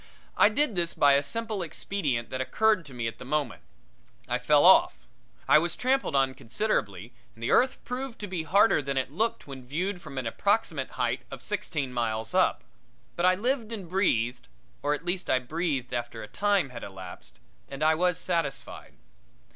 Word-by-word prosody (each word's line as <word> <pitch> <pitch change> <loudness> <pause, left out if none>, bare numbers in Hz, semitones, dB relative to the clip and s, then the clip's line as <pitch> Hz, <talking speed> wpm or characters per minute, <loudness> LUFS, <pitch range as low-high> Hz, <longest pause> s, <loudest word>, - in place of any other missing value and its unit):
I - - +6
did 250 +2 +1
this 170 -1 0
by 145 -1 +5
a 140 - +4
simple 220 +7 -3
expedient 155 -7 -3
that 130 - -2
occurred 210 +3 +2
to 135 - -12
me 120 -1 -3
at 115 - -4
the - - -8
moment. 140 -1 -2 0.7
I - - 0
fell - - +4
off. - - +6 0.5
I 155 - +7
was 170 +2 -2
tramped 265 +2 +1
on 135 -2 +1
considerably, 115 - -2 0.2
and 115 - -11
the - - 0
earth 255 +1 +3
proved 250 0 -5
to 205 - -4
be 180 -3 -3
harder 195 +3 +4
than 140 -1 -3
it 130 0 -1
looked 220 +9 -1
when 135 -2 -9
viewed 180 +6 -2
from 135 - -10
an 130 - -2
approximate 160 - 0
height 120 -1 0
of 135 -2 -9
sixteen 155 -10 -3
miles 110 -2 -2
up, - - +2 0.5
but 175 +1 +2
I 185 - +5
lived 235 +2 -1
and 200 -6 -6
breathed 125 - 0 0.3
or 145 +1 +1
at 150 +4 -10
least 180 +1 -2
I - - +4
breathed 135 -1 -2
after 120 -2 -4
a - - -8
time 200 - +1
had 120 -2 -8
elapsed 95 -2 -10 0.3
and 140 +2 -4
I 155 +1 +5
was 180 +1 +1
satisfied. 165 -7 -3
150 Hz, 185 wpm, -27 LUFS, 125-195 Hz, 0.7 s, I